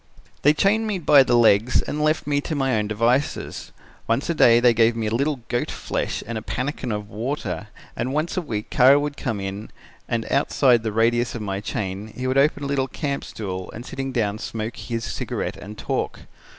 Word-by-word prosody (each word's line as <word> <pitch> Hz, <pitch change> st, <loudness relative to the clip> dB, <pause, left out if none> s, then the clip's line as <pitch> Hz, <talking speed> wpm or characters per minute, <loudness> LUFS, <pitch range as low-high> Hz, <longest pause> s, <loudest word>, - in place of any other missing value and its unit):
"They 150 Hz, +2 st, +5 dB
chained 215 Hz, +6 st, +2 dB
me 205 Hz, -3 st, -1 dB
by 150 Hz, -4 st, +6 dB
the 120 Hz, -2 st, +3 dB
legs 115 Hz, +1 st, +4 dB
and 150 Hz, 0 st, -3 dB
left 155 Hz, +1 st, +1 dB
me 145 Hz, 0 st, +1 dB
to 155 Hz, -, -4 dB
my 135 Hz, -3 st, +1 dB
own 105 Hz, -1 st, 0 dB
devices. 115 Hz, +6 st, -1 dB, 0.4 s
Once 125 Hz, +9 st, +1 dB
a -, -, +1 dB
day 120 Hz, -7 st, +6 dB
they 120 Hz, 0 st, +5 dB
gave 115 Hz, 0 st, +3 dB
me 115 Hz, -1 st, -2 dB
a 110 Hz, -, -1 dB
little 140 Hz, +2 st, 0 dB
goat 120 Hz, -, -1 dB
flesh -, -, -3 dB
and 115 Hz, 0 st, -4 dB
a -, -, -11 dB
pannikin 130 Hz, +2 st, -3 dB
of 105 Hz, -1 st, -3 dB
water 125 Hz, +8 st, -3 dB, 0.3 s
and 130 Hz, -, -2 dB
once 155 Hz, +4 st, -1 dB
a 185 Hz, -, 0 dB
week 110 Hz, -10 st, -5 dB
Kara 135 Hz, +3 st, +6 dB
would 145 Hz, 0 st, -3 dB
come 120 Hz, -7 st, -3 dB
in 100 Hz, +2 st, -5 dB, 0.4 s
and 115 Hz, -1 st, -1 dB
outside 135 Hz, -3 st, +3 dB
the 110 Hz, -1 st, -2 dB
radius 120 Hz, +3 st, +1 dB
of 115 Hz, -, -4 dB
my 100 Hz, -1 st, -2 dB
chain 100 Hz, 0 st, -4 dB
he 125 Hz, +3 st, -4 dB
would 130 Hz, +1 st, +2 dB
open 145 Hz, +1 st, +2 dB
a -, -, -2 dB
little 140 Hz, -1 st, 0 dB
camp 140 Hz, +1 st, -3 dB
stool 95 Hz, -3 st, -6 dB
and 120 Hz, +3 st, -8 dB
sitting 135 Hz, 0 st, -4 dB
down 110 Hz, -4 st, -1 dB
smoke 110 Hz, +1 st, -4 dB
his 115 Hz, -1 st, -4 dB
cigarette -, -, -3 dB
and 105 Hz, +1 st, -9 dB
talk. -, -, -3 dB
120 Hz, 210 wpm, -23 LUFS, 110-140 Hz, 0.4 s, by